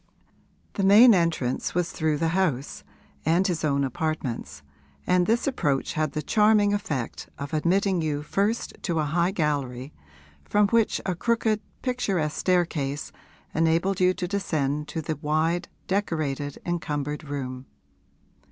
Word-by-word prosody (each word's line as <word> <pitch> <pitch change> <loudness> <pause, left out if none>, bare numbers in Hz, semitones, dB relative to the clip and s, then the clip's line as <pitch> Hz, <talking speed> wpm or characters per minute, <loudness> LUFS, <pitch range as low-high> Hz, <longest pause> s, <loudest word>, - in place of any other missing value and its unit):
The 200 - -2
main 215 +5 +8
entrance 165 -9 0
was 180 -1 0
through 155 -2 0
the 165 +2 +1
house 160 -7 -1 0.4
and 170 +5 +3
his 175 -4 -1
own 140 -2 +1
apartments, 135 - -3 0.4
and 180 -1 +3
this 230 +2 +2
approach 145 - 0
had 155 -2 -1
the 155 - -3
charming 210 -1 +4
effect 150 - -3
of 140 +3 -6
admitting 180 +3 +2
you 150 -2 -2
first 205 +8 -1
to 170 -4 -1
a 155 - +2
high 170 +4 +1
gallery, 145 -6 -2 0.5
from 205 - +3
which 230 -1 +2
a 185 - 0
crooked 220 +2 0 0.2
picturesque 195 - -1
staircase 165 -6 0 0.4
enabled 165 +4 +1
you 185 0 +3
to 180 - -3
descend 150 -7 -1
to 160 +1 -4
the 155 0 -3
wide, 155 +4 0 0.2
decorated, 155 -7 -2
encumbered 150 -4 -3
room. 130 -3 -5
165 Hz, 135 wpm, -26 LUFS, 145-190 Hz, 0.5 s, main